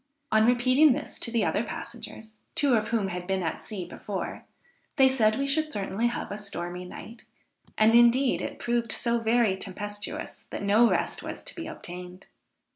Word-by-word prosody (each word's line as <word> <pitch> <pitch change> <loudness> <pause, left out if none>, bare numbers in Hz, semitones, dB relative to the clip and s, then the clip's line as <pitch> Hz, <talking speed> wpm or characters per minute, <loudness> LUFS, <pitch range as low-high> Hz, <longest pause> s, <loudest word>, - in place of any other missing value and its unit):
On 220 +1 +5
repeating 255 +4 +5
this - - -6
to - - -1
the 230 -3 +1
other 210 - +1
passengers, 220 -2 -8 0.2
two 280 -3 +3
of 215 -2 +2
whom 220 -5 0
had 180 -1 -5
been 190 -1 0
at 165 - -3
sea 195 -5 -5
before, 190 +2 -5 0.5
they 265 -2 +6
said 225 -5 +3
we 275 - 0
should 305 +2 +1
certainly 205 0 -1
have 240 - -4
a 205 - -4
stormy 180 -3 -5
night, 225 +6 -10 0.5
and 215 +1 +5
indeed 240 +3 +5
it - - -5
proved 235 -1 -1
so 235 0 0
very 225 -3 +3
tempestuous 205 +2 -6
that - - -5
no 215 +4 +5
rest - - 0
was - - -6
to - - -7
be 335 -2 -6
obtained. 180 - -9
220 Hz, 180 wpm, -27 LUFS, 200-240 Hz, 0.5 s, they